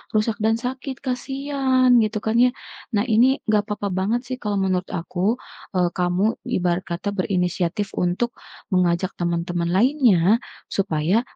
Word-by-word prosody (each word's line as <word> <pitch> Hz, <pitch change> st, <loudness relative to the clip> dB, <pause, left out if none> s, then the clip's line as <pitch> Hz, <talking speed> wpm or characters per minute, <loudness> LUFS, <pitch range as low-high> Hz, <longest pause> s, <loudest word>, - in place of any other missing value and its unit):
rusak 215 Hz, +1 st, +1 dB
dan 220 Hz, +1 st, +3 dB
sakit, 260 Hz, +2 st, -5 dB
kasihan, 265 Hz, 0 st, +1 dB
gitu, 215 Hz, 0 st, -1 dB
kan, 220 Hz, +1 st, 0 dB
ya. 250 Hz, +1 st, +6 dB, 0.5 s
Nah, 205 Hz, -, +3 dB
ini 250 Hz, +4 st, +4 dB
enggak 210 Hz, -1 st, +2 dB
papa 205 Hz, -1 st, -2 dB
banget, 230 Hz, +6 st, 0 dB
sih, 255 Hz, 0 st, -4 dB
kalau 205 Hz, -1 st, -1 dB
menurut 185 Hz, -1 st, 0 dB
aku, 185 Hz, +4 st, -1 dB, 0.4 s
eee, 180 Hz, -1 st, +3 dB
kamu 180 Hz, +1 st, 0 dB, 0.3 s
ibarat 175 Hz, 0 st, 0 dB
kata 175 Hz, +4 st, -2 dB
berinisiatif 185 Hz, 0 st, -1 dB
untuk 180 Hz, +7 st, 0 dB, 0.4 s
mengajak 180 Hz, +1 st, +2 dB
teman-teman 170 Hz, 0 st, -1 dB
lainnya, 220 Hz, -, +4 dB, 0.3 s
supaya 185 Hz, +2 st, +1 dB
205 Hz, 135 wpm, -22 LUFS, 180-245 Hz, 0.5 s, ya